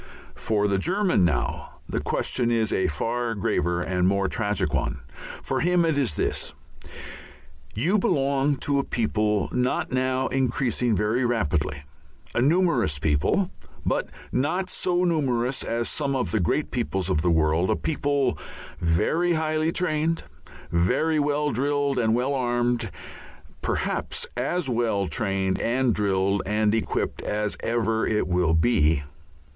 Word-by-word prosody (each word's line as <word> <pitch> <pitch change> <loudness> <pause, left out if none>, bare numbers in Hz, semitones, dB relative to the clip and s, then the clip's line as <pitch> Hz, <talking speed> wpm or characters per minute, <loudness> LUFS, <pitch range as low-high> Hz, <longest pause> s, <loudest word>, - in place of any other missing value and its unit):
For 105 -2 0
the 100 -1 +1
German 185 - +2
now 75 -9 -1
the - - -2
question 120 -2 -1
is 115 -2 +1
a 95 - +2
far 115 +9 -2
graver 85 -3 0
and 90 0 +1
more 100 0 +2
tragic 105 -2 -1
one. - - -1 0.4
For 130 - -1
him 175 +2 +3
it 160 -2 +1
is 135 - 0
this: - - -2 1.2
"You 175 - +2
belong 140 -3 +1
to 140 -1 +2
a - - +1
people 105 -4 0
not 125 0 0
now 130 0 0
increasing 125 -3 0
very 110 +5 +1
rapidly, 75 - 0 0.5
a - - +1
numerous 145 - +2
people, 75 - +1 0.3
but - - 0 0.2
not 175 +8 0
so 180 -1 0
numerous 130 -7 0
as 115 0 -2
some 140 -2 -1
of 125 -10 -1
the 110 - +1
great 95 - 0
peoples 95 -7 -1
of 90 -5 +1
the 90 - +1
world, 80 +2 +2
a 110 - +3
people 140 - 0 0.4
very 160 - +1
highly 155 0 0
trained, 165 -2 0 0.5
very 95 - +2
well 145 0 +1
drilled 140 +1 0
and 110 -1 +2
well 130 +4 0
armed, 120 -2 0 0.7
perhaps - - -2
as 140 +6 -1
well 115 -5 0
trained 95 -2 -1
and 125 0 +1
drilled 100 -1 +1
and 105 0 +2
equipped 115 - -1
as 105 0 -2
ever 115 -1 0
it 105 -3 0
will 90 -3 +2
be. 80 -5 +3
120 Hz, 140 wpm, -25 LUFS, 95-140 Hz, 1.2 s, him